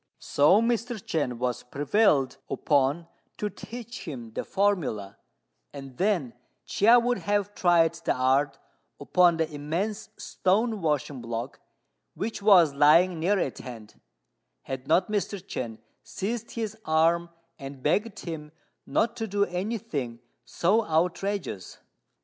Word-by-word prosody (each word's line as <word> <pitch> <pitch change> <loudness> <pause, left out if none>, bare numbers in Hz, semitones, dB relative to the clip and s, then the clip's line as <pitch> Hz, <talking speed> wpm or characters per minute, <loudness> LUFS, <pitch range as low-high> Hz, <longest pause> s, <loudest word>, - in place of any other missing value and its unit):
So 180 +10 +4
Mr. 235 +1 0
Chên 150 - -2
was 125 0 -2
prevailed 140 - +1
upon 145 +3 +1 0.3
to 210 -1 -3
teach 235 -3 -9
him 120 -7 -7
the - - -3
formula, 165 - -1 0.5
and 135 -2 -9
then 180 - 0 0.3
Chia 230 +4 +5
would 245 -2 +1
have 205 +3 -1
tried 170 -4 +3
the 170 0 -1
art 135 +2 +2 0.4
upon 175 -2 +3
the 160 -1 +1
immense 175 +9 -3
stone 215 +3 0
washing 145 -4 -1
block 115 +2 -5 0.6
which 220 0 -4
was 180 -8 +6
lying 160 +5 +5
near 195 +5 +2
at 140 -8 -2
hand, 115 -4 -10 0.6
had 130 0 -6
not 185 - +3
Mr. 205 -1 -1
Chên 125 - -6 0.2
seized 230 +3 -4
his 220 -2 -3
arm 165 +2 +2 0.3
and 135 -2 -9
begged 205 +8 0
him 155 -3 -7 0.4
not 230 - +1
to 225 -2 -3
do 200 0 +1
any 195 +6 -3
thing 135 - -5 0.2
so 200 - +1
outrageous. 175 - -1
170 Hz, 130 wpm, -27 LUFS, 140-205 Hz, 0.6 s, was